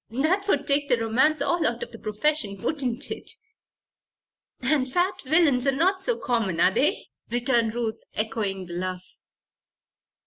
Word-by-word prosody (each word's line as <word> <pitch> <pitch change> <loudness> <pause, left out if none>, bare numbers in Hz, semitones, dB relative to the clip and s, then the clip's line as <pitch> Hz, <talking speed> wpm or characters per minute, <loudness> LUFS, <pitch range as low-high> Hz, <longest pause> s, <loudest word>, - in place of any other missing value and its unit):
That 315 - 0
would 290 -7 +1
take 280 0 +1
the 245 - +4
romance 265 +7 +2
all 325 +4 +1
out 240 -5 0
of - - -9
the 230 - -9
profession; 215 -1 -1
wouldn't 255 +2 -2
it?" - - -5 1.3
"And 265 -4 +1
fat 360 +4 0
villains 280 -3 +3
are - - +5
not 375 +6 +2
so 470 +4 +1
common; 225 -9 -1
are 180 - +5
they?" 285 - 0 0.2
returned 235 -2 +1
Ruth, 230 -2 -3
echoing 210 -4 -2
the 175 - -9
laugh. 185 +1 -5
250 Hz, 150 wpm, -25 LUFS, 220-305 Hz, 1.3 s, are